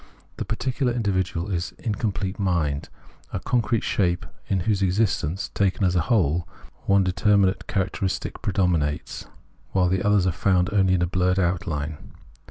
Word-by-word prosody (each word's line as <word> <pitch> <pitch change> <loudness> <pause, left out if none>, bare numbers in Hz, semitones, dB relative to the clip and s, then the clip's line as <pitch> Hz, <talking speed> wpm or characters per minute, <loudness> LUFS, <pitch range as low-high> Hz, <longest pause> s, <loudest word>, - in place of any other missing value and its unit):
The - - -3
particular 125 +3 -1
individual 95 -5 -1
is 85 -1 -2
incomplete 100 -3 -2
mind, 80 -7 0 0.4
a - - -2
concrete 115 +3 0
shape 90 -3 0 0.2
in 95 -2 0
whose 100 +2 0
existence, 95 -3 0
taken 100 0 +1
as 90 -1 +2
a 90 - +3
whole, 85 -4 +1 0.4
one 100 0 +5
de 95 - 0
terminate 100 0 +2
characteristic 95 0 -2
predominates, 85 -6 -1 0.5
while 90 -2 +3
the 95 +1 +1
others 105 -2 +3
are 90 - +2
found 90 +2 +1
only 95 -2 +4
in 90 -1 +2
blurred 90 +1 +1
outline. 80 -5 -1
95 Hz, 145 wpm, -24 LUFS, 90-100 Hz, 0.5 s, one